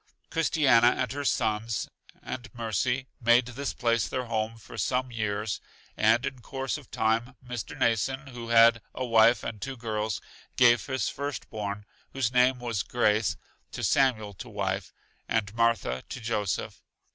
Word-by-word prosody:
Christiana 140 -7 +4
and 125 -3 -1
her 145 +2 -3
sons 110 -4 0 0.4
and 120 -4 -6
Mercy 120 +3 -1 0.2
made 120 +1 +5
this 135 +3 -3
place 115 -1 +1
their 130 -1 -3
home 115 -1 -2
for 110 - -12
some 125 +5 0
years, 105 -2 -2 0.3
and 115 +3 +3
in 130 - -4
course 135 +2 -3
of 140 - -17
time 115 +3 0
Mr. 120 -5 -6
Mnason, 130 +5 0
who 120 -2 -8
had 115 0 +6
a 130 - -2
wife 115 -1 +5
and 110 -3 -5
two 135 -1 -5
girls, 110 -3 -2 0.4
gave 120 -4 +5
his 130 -6 -1
first 140 -2 -4
born, 105 -1 -4 0.3
whose 130 -3 0
name 125 +1 +4
was 120 -4 -2
Grace, 110 -2 +1 0.4
to - - -5
Samuel 110 -7 +2
to 120 +6 -9
wife, 95 -2 -2 0.4
and 105 -3 0
Martha 115 - +1
to - - -5
Joseph. 110 -4 -2
115 Hz, 155 wpm, -28 LUFS, 110-125 Hz, 0.4 s, had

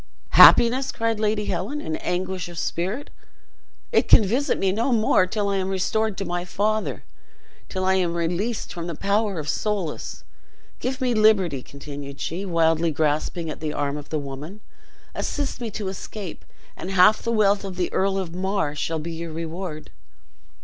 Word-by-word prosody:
"Happiness!" 255 +3 +7
cried 225 -1 -1
Lady 210 -1 0
Helen, 195 +13 -2
in 160 - -3
anguish 180 0 -3
of 175 - -10
spirit; 190 - -3 0.8
"it - - +3
can 220 - +7
visit 260 +9 +1
me 190 - +1
no 230 +7 0
more 215 -5 +3
till 205 +1 -1
I 200 -1 0
am 190 0 -1
restored 205 +2 0
to 195 - -3
my 175 0 -2
father, 215 +4 -1 0.7
till 185 -1 -2
I 190 - +3
am 180 -3 +1
released 180 +7 -2
from 170 0 -5
the 170 - -4
power 200 +2 0
of 150 -2 -4
Soulis. 200 -3 -2 0.6
Give 260 +2 -3
me 250 -1 +2
liberty," 200 - +3
continued 140 0 -9
she, 185 +5 -3
wildly 165 -1 +2
grasping 155 +1 -1
the 150 -1 -3
arm 145 -1 -1
of 145 -1 -8
the 155 - -1
woman. 145 +8 -7 0.5
"Assist 285 -3 -3
me 235 - -3
to 210 -1 -5
escape, 190 0 -7 0.3
and 185 - -6
half 195 +3 +5
the 230 - -2
wealth 205 -3 +3
of 195 -2 -6
the 180 -1 -2
Earl 195 0 +1
of 180 -4 -3
Mar 190 -4 -1
shall 160 +2 -2
be 160 +2 -5
your 165 0 -5
reward." 165 0 -6
185 Hz, 170 wpm, -24 LUFS, 165-215 Hz, 0.8 s, Happiness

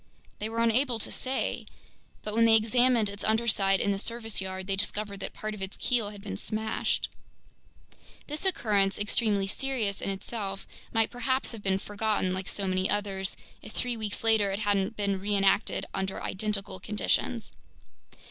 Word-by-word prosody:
They 215 - -2
were 230 +1 0
unable 235 +2 +3
to 225 - -1
say. 260 +1 -1 0.6
But 210 - -4
when 230 +1 +5
they 225 -1 +7
examined 235 +1 +4
its 200 0 -5
undersides 215 -3 +3
in 200 - +2
the 195 - -1
service 225 -1 -1
yard, 190 0 -4
they 195 0 0
discovered 205 0 0
that - - -3
part 215 0 -3
of 210 - -8
its 190 +1 -4
keel 235 -4 +1
had 205 -1 -10
been 95 - -4
smashed. 220 - -1 1.2
This 300 +3 -4
occurrence, 205 - +2
extremely 205 -1 +1
serious 220 -2 -1
in - - -2
itself, 195 0 -3 0.3
might 225 -1 +2
perhaps 260 +2 0
have 225 -3 -7
been 195 -1 +2
forgotten 205 -2 0
like 185 0 -3
so 200 - -2
many 185 0 +1
others, 195 -2 -1 0.2
if - - -10
three 245 -1 0
weeks 215 -2 -3
later 220 -3 +4
it 195 - -1
hadn't 205 +1 +1
been 200 -2 0
reenacted 195 0 +2
under 190 0 -2
identical 200 -1 -1
conditions. 205 - 0
205 Hz, 165 wpm, -29 LUFS, 195-225 Hz, 1.2 s, they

